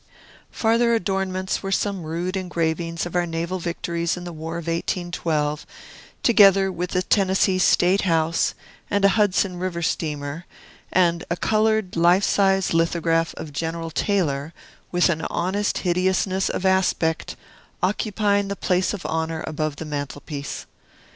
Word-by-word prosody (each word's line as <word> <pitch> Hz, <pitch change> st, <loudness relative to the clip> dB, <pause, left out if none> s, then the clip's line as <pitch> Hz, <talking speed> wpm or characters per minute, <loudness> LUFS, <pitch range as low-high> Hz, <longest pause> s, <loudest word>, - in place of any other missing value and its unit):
Farther 230 Hz, +1 st, +2 dB
adornments 190 Hz, -2 st, -1 dB
were 195 Hz, -, -4 dB
some 195 Hz, -1 st, 0 dB
rude 170 Hz, +4 st, -3 dB
engravings 170 Hz, -2 st, -2 dB
of 175 Hz, -, -7 dB
our 175 Hz, -1 st, +1 dB
naval 170 Hz, +3 st, -3 dB
victories 170 Hz, 0 st, -2 dB
in 180 Hz, -, -7 dB
the 175 Hz, -1 st, -7 dB
War 165 Hz, +1 st, -5 dB
of 170 Hz, -, -6 dB
1812, 165 Hz, -3 st, -1 dB, 0.6 s
together 195 Hz, -4 st, +6 dB
with 180 Hz, 0 st, -3 dB
the 180 Hz, 0 st, 0 dB
Tennessee 190 Hz, -1 st, +2 dB
State 185 Hz, +1 st, +4 dB
House, 165 Hz, -2 st, +1 dB, 0.3 s
and 200 Hz, -1 st, +2 dB
a -, -, +7 dB
Hudson 195 Hz, -3 st, +2 dB
River 175 Hz, -2 st, -3 dB
steamer, 150 Hz, 0 st, -3 dB, 0.4 s
and 170 Hz, -2 st, +2 dB
a 170 Hz, -, -1 dB
colored, 215 Hz, -2 st, +1 dB
life 175 Hz, +3 st, +4 dB
size 195 Hz, -2 st, +2 dB
lithograph 165 Hz, 0 st, +1 dB
of 150 Hz, -, -7 dB
General 165 Hz, +2 st, -3 dB
Taylor, 160 Hz, -5 st, 0 dB, 0.4 s
with 175 Hz, 0 st, +3 dB
an 165 Hz, -3 st, 0 dB
honest 195 Hz, +4 st, -1 dB
hideousness 185 Hz, +1 st, +1 dB
of 190 Hz, -, -3 dB
aspect, 185 Hz, -4 st, +1 dB, 0.5 s
occupying 205 Hz, +1 st, +1 dB
the 200 Hz, -, -3 dB
place 185 Hz, +1 st, 0 dB
of 195 Hz, -, -9 dB
honor 160 Hz, 0 st, -2 dB
above 155 Hz, -1 st, -2 dB
the 160 Hz, -, -7 dB
mantel 145 Hz, -1 st, -5 dB
piece. 145 Hz, -1 st, -6 dB
175 Hz, 140 wpm, -23 LUFS, 165-195 Hz, 0.6 s, a